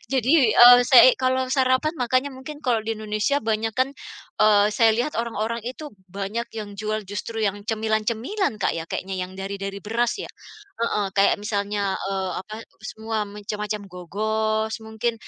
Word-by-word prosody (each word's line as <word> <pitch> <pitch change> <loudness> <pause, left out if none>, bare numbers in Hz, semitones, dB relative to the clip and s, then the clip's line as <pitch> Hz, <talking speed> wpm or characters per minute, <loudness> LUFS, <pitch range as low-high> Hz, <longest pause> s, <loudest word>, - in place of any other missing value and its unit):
jadi, 260 -1 +1 0.3
eee, 245 0 +10
sei 255 -1 +9
kalo 260 0 +1
sarapan 265 +3 +2
makannya 255 +3 +1
mungkin 265 +3 -9
kalo 245 -3 +2
di 225 - -1
Indonesia 215 +5 0
banyakan, 225 +2 0 0.5
eee, 205 -1 +5
saya 225 0 +5
lihat 245 +6 -1
orang-orang 230 0 -3
itu 295 +4 -8 0.2
banyak 200 +5 -4
yang 210 -1 -6
jual 215 0 -2
justru 205 +3 -5
yang 205 0 -2
cemilan-cemilan 220 - -1
Kak - - +2
ya? 165 - -3
Kayaknya 190 0 -4
yang 180 +1 -7
dari 195 +1 -4
dari 195 0 -4
beras 230 +4 -1
ya? - - -5 0.6
Heeh, 210 -3 0
kayak 200 0 +5
misalnya, 200 -2 -1
eee, 190 -1 -3
apa 215 +1 -8 0.2
semua 220 -1 -3
macam-macam 210 +1 -5
gogos 215 +4 -2
mungkin, 220 +2 -2
220 Hz, 155 wpm, -23 LUFS, 205-240 Hz, 0.6 s, eee